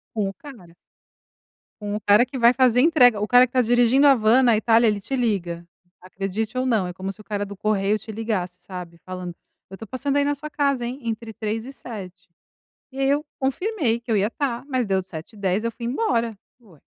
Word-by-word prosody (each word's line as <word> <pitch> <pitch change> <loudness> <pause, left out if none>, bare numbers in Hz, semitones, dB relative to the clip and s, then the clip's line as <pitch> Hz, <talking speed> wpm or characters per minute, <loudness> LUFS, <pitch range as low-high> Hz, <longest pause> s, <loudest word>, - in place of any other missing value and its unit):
Com 200 -3 0
o - - -8
cara. 190 - -14 1.1
Com 205 0 -3
o - - -2
cara 205 +4 +5
que 260 +1 -7
vai 235 +1 +6
fazer 250 -1 +3
entrega 250 -9 +5
o 210 - -1
cara 245 +1 +6
que 245 - -14
tá 255 - +4
dirigindo 245 +4 +4
a 275 - +7
van 225 +3 +4
na 235 -2 +5
Itália 225 +1 +4
ele 205 -2 0
te 270 - -3
liga. 175 -8 -2 0.3
Acredite 195 +5 -4
ou 255 - 0
não, 220 -7 +1
é 180 - -6
como 190 +1 -5
se 195 - -15
o 215 - -12
cara 205 -1 -3
do 200 -1 -10
correio 210 0 +1
te 220 - -9
ligasse, 210 -5 -3
sabe, 180 -3 -9
falando: 180 -2 -6 0.3
"Eu 190 - -10
tô 225 - -9
passando 275 +4 -2
aí 285 - +3
na 290 0 0
sua 300 +2 -8
casa, 280 -4 0
hein, 255 +4 -5
entre 225 0 -4
15h 220 +2 -4
e 270 - -9
19h. 190 -8 -10 0.6
E 265 - -9
aí 270 0 +2
eu 290 +2 +1
confirmei 270 - -1
que 235 0 -7
eu 215 - +3
ia 200 +2 +2
estar, 250 0 -3
mas 255 -3 0
deu 190 -2 +1
19:10h, 190 +4 -3
eu 230 - -1
fui 235 - -8
embora. 235 - -1 0.2
Ué! 190 -10 -21
225 Hz, 225 wpm, -23 LUFS, 195-255 Hz, 1.1 s, a